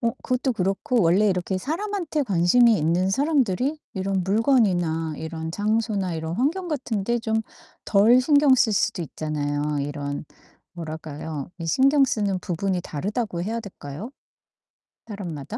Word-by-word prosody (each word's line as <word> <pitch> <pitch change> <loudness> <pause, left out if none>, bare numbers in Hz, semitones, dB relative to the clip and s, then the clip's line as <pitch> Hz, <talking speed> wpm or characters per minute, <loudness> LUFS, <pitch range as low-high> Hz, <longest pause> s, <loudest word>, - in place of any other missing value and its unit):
어 230 -1 +1
그것도 255 +1 0
그렇고 210 +5 0
원래 190 +6 +4
이렇게 185 0 -1
사람한테 330 - -2
관심이 215 +2 +4
있는 170 +5 +1
사람들이 275 - +1
이런 190 -1 -1
물건이나 180 - +2
이런 160 0 -5
장소나 205 -1 -1
이런 160 +1 -4
환경 335 - 0
같은데 235 -6 -1
좀 220 -1 -1 0.4
덜 220 +5 +5
신경 285 -1 +5
쓸 225 -3 +3
수도 200 -2 0
있잖아요. 150 -1 -2
이런 145 0 -4 0.5
뭐랄까요? 155 -2 -6
이 165 - -5
신경 275 - +4
쓰는 205 -6 0
부분이 180 +1 -2
다르다고 195 - -3
해야 225 +4 -2
될까요, 190 - -8 1.0
사람마다? 180 - -6
195 Hz, 310 characters per minute, -24 LUFS, 165-245 Hz, 1.0 s, 덜